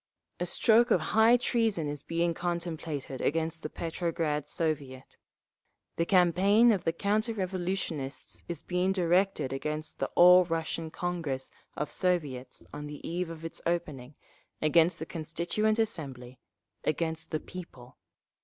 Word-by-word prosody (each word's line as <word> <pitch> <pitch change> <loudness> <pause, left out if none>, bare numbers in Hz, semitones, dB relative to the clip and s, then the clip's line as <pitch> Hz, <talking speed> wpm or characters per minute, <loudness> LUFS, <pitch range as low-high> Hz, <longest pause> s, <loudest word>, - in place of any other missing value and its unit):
A 175 - -1
stroke 230 +6 +4
of 190 - +4
high 225 +3 +6
treason 225 -9 0
is 145 -1 -4
being 170 +2 0
contemplated 165 -6 -4
against 160 +1 0
the 155 - -4
Petrograd 165 -3 -2
Soviet…. 140 -5 -3 0.8
The 170 - 0
campaign 195 +5 +5
of 200 -5 -1
the 165 - +3
counter 210 +6 0
revolutionists 180 -7 -3
is 170 -2 -5
being 180 +1 0
directed 180 -5 +1
against 150 +3 -3
the - - 0
All 180 +1 +8
Russian 165 -1 -3
Congress 160 -7 -3 0.3
of 150 - -3
Soviets 145 -9 0
on 150 0 -6
the 145 0 -8
eve 175 +1 -2
of 165 -1 -8
its 165 - -4
opening, 145 -6 -3 0.4
against 165 +2 +4
the 160 - -5
Constituent 175 +7 -1
Assembly, 135 - -3 0.4
against 160 +1 -2
the 155 - -1
people. 140 -9 -11
165 Hz, 135 wpm, -29 LUFS, 150-180 Hz, 0.8 s, All